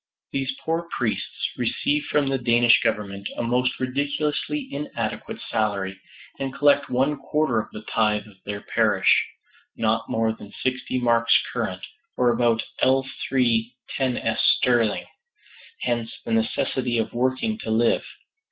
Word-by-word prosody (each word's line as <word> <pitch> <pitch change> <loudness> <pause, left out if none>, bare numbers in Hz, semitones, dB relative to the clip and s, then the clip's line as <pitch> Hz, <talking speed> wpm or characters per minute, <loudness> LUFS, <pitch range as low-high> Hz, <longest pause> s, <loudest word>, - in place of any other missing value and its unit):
These 135 -1 -2
poor 165 +1 -1
priests 110 -6 -2
receive 150 0 0
from 145 -1 +1
the 135 -1 0
Danish 120 -1 +5
Government 100 -1 -2
a - - -1
most 125 +2 +1
ridiculously 145 - -1
inadequate 145 +1 -4
salary, 100 -3 -1 0.4
and 135 -1 -2
collect 145 0 +3
one 135 +4 +1
quarter 150 -4 +1
of - - -5
the 105 - -8
tithe 105 -2 +1
of 105 -3 -17
their 105 0 -5
parish - - +3 0.5
not 115 0 0
more 110 0 +1
than 105 -2 -12
sixty 130 0 -1
marks 115 -1 +4
current, - - -3 0.3
or 125 -1 +4
about 115 -2 +2 0.2
L3 130 -3 +1 0.2
10s. 125 -4 0 0.2
sterling. 120 -4 +2 0.8
Hence 120 -1 -1
the - - -4
necessity 120 +2 0
of 110 - -1
working 130 - 0
to - - -6
live. 115 +1 +3
120 Hz, 135 wpm, -24 LUFS, 110-135 Hz, 0.8 s, Danish